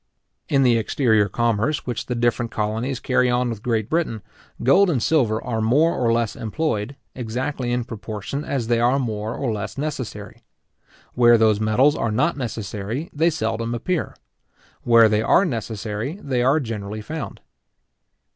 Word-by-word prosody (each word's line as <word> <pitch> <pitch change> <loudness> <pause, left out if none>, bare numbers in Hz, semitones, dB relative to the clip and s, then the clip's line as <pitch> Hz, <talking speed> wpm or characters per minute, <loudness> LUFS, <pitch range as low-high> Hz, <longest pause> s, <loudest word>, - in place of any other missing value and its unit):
In 135 -2 +3
the 120 -2 +4
exterior 110 -3 +2
commerce 120 +7 0
which 125 -3 -4
the 125 - -2
different 120 0 0
colonies 110 +5 -2
carry 125 -1 +2
on 125 0 +1
with 110 -3 -6
Great 110 -3 -1
Britain, 155 -10 -1 0.4
gold 180 +10 +5
and 155 - +1
silver 120 -9 +2
are 115 -3 -2
more 145 +10 +3
or 120 -2 +1
less 115 -2 0
employed, 115 0 -2 0.2
exactly 125 +2 -3
in 120 0 0
proportion 110 +4 -5
as 135 -6 -2
they 115 0 +1
are 120 +3 +3
more 110 -4 -3
or 125 -5 -2
less 105 +2 -5
necessary. 120 -6 -5 0.7
Where 120 -1 +6
those 110 -2 +3
metals 120 +7 +3
are 115 - -1
not 145 +10 +1
necessary, 115 - -4
they 160 +3 +3
seldom 115 -5 -2
appear. 170 +8 -2 0.7
Where 115 -2 +6
they 105 0 +2
are 175 - +4
necessary, 115 - -4
they 130 -7 -1
are 135 +5 +3
generally 110 -4 -5
found. 140 -3 -6
120 Hz, 155 wpm, -22 LUFS, 110-135 Hz, 0.7 s, Where